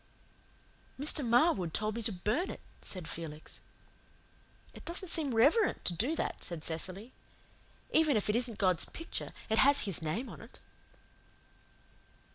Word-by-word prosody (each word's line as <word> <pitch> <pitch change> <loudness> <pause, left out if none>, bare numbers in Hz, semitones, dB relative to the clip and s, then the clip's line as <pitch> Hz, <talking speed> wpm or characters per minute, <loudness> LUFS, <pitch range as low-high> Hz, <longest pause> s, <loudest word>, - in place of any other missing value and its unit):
"Mr. 295 +1 +4
Marwood 235 - +2
told 215 +1 +1
me 235 - -3
to 225 0 -2
burn 215 - -1
it," - - -7 0.2
said 180 -4 -2
Felix. 155 -2 -6 1.1
"It - - -12
doesn't 350 +2 -4
seem 295 -8 0
reverent 310 - +3
to 175 - +3
do 250 - 0
that," - - -3
said 170 -3 -1
Cecily. 185 +8 -2 0.8
"Even 310 -6 +4
if 210 - -1
it 210 - +1
isn't 235 -2 0
God's 185 -4 +2
picture, 330 - -6 0.2
it 220 0 +2
has 280 +1 +6
His 195 -6 +1
name 170 +12 -2
on - - -10
it." - - -13
225 Hz, 145 wpm, -32 LUFS, 180-285 Hz, 1.1 s, has